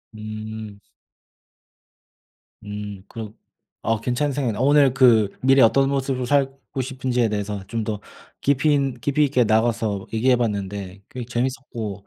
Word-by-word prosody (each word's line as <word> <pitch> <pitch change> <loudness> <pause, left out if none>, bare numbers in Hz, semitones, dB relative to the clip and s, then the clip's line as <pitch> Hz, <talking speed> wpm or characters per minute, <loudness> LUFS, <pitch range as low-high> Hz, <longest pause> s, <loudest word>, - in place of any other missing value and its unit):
음. 110 -1 -7 1.9
음 105 -2 -6
그런 110 -1 -8 0.4
어 115 -1 0
괜찮은 135 +4 0
생각이네요. 125 -5 -1
오늘 140 -1 +5
그 120 -6 +5
미래에 135 +1 +6
어떤 135 +4 +4
모습으로 135 -2 -1
살고 135 0 0
싶은지에 125 -2 -1
대해서 105 -1 -3
좀 115 +2 -2
더 105 -1 -3 0.4
깊이 140 +2 +3
있 135 -4 0
깊이 145 +3 +2
있게 130 -3 +2
나가서 110 -2 +1
얘기해 125 +3 +3
봤는데 100 -4 -3
꽤 125 -1 -6
재밌었고 120 -4 -4
120 Hz, 285 characters per minute, -23 LUFS, 105-135 Hz, 1.9 s, 미래에